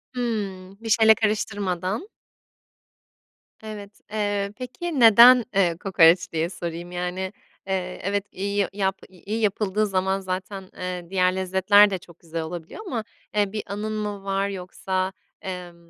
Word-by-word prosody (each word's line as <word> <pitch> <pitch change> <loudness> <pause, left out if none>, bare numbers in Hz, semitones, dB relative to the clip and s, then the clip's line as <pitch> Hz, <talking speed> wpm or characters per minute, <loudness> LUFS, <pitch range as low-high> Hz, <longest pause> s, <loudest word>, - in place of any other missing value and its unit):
Hıı. 200 -6 -3
Bir 225 - -6
şeyle 220 0 +6
karıştırmadan. 205 - -1 1.5
Evet, 210 -1 -9
eee, 205 -2 -1
peki, 270 +4 -4
neden, 235 +2 +8
eee, 175 -4 +3
kokoreç 175 -2 +4
diye 165 +1 -1
sorayım. 175 -1 -6
Yani, 180 +2 -3 0.3
eee, 185 -1 -2
evet, 200 +1 -1
iyi 200 +2 -3
y 195 - +1
yap 195 -1 -1
iyi 200 +4 -5
yapıldığı 210 0 +1
zaman 190 0 0
zaten, 190 +1 -4 0.2
ııı, 180 -1 -5
diğer 185 -1 +2
lezzetler 190 +2 +5
de 190 - -2
çok 170 -1 -17
güzel 165 -1 -5
olabiliyor. 170 - -7
Ama, 230 -7 -2 0.3
eee, 205 -2 +2
bir 215 -1 -4
anın 210 +2 -4
mı 205 -2 -4
var 195 0 0
yoksa, 185 0 -3 0.3
emm, 175 -2 -8
195 Hz, 140 wpm, -24 LUFS, 180-210 Hz, 1.5 s, neden